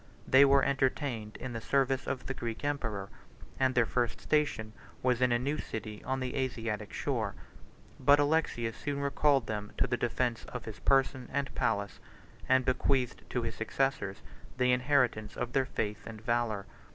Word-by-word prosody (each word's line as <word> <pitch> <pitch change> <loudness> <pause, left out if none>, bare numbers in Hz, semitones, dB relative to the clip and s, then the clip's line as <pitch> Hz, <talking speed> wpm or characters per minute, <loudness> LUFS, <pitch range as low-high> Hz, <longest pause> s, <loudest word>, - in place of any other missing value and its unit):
They 135 +2 +8
were 140 0 +5
entertained 130 -5 0
in 130 -1 -6
the 115 - -4
service 135 +1 +1
of 135 -2 -3
the 135 - -2
Greek 115 +1 -5
emperor; 115 -9 -2 0.5
and 130 -1 +2
their 125 -2 +5
first 120 0 -1
station 150 -8 0 0.3
was 125 -1 +2
in 125 -1 +4
a 120 - +4
new 140 +5 -1
city 110 -1 -6
on 130 0 -1
the 130 -1 -3
Asiatic 115 -5 -2
shore: - - -2 0.6
but 140 +2 +6
Alexius 145 -6 +1
soon 140 -1 -3
recalled 140 -2 +3
them 105 -1 -4
to - - +3
the 120 - 0
defence 120 -1 -1
of 125 - -7
his 110 -1 -7
person 135 -2 +2
and 140 -1 -2
palace; 100 -3 -1 0.5
and 130 -1 +4
bequeathed 130 -1 0
to 125 - -1
his 115 -1 -2
successors 110 -3 -1 0.3
the 125 0 +3
inheritance 125 -4 +2
of 125 0 -3
their 135 -1 +2
faith 105 0 -3
and 110 -1 -7
valor. 115 -3 0
125 Hz, 170 wpm, -31 LUFS, 115-135 Hz, 0.6 s, They